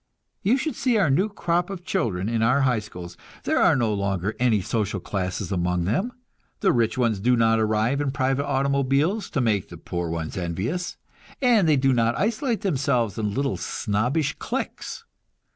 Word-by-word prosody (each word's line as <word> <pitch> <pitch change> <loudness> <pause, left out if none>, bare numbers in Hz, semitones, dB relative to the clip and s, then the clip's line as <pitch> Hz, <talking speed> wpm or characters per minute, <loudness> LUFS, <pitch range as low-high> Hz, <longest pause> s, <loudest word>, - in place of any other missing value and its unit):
You 235 +7 +3
should 310 +3 -2
see 245 -4 +1
our 190 -9 +3
new 190 +10 +2
crop 175 -3 -1
of 185 -3 -7
children 95 - -1
in 115 0 0
our 125 +5 +3
high 125 -4 +2
schools! 90 -5 -9 0.3
There - - +1
are - - +5
no 115 -4 +1
longer 100 0 -1
any 120 -4 +3
social 100 +1 -1
classes 90 0 -3
among 90 -1 0
them; 185 - 0 0.5
the 195 - +4
rich 115 -1 +1
ones 115 -5 +1
do 125 +5 +3
not 115 -1 +3
arrive 110 +5 +1
in 145 - 0
private 135 +1 0
automobiles, 140 +8 +1
to 135 - -1
make 105 -6 0
the - - -9
poor 85 -1 -4
ones 80 0 -4
envious, 95 - -3 0.4
and 230 - +4
they 150 - +4
do 135 0 +3
not 115 -1 +2
isolate 230 +2 0
themselves 135 - 0
in 105 -2 -2
little 135 0 0
snobbish 125 +9 -1
cliques. - - -4
125 Hz, 175 wpm, -24 LUFS, 105-150 Hz, 0.5 s, are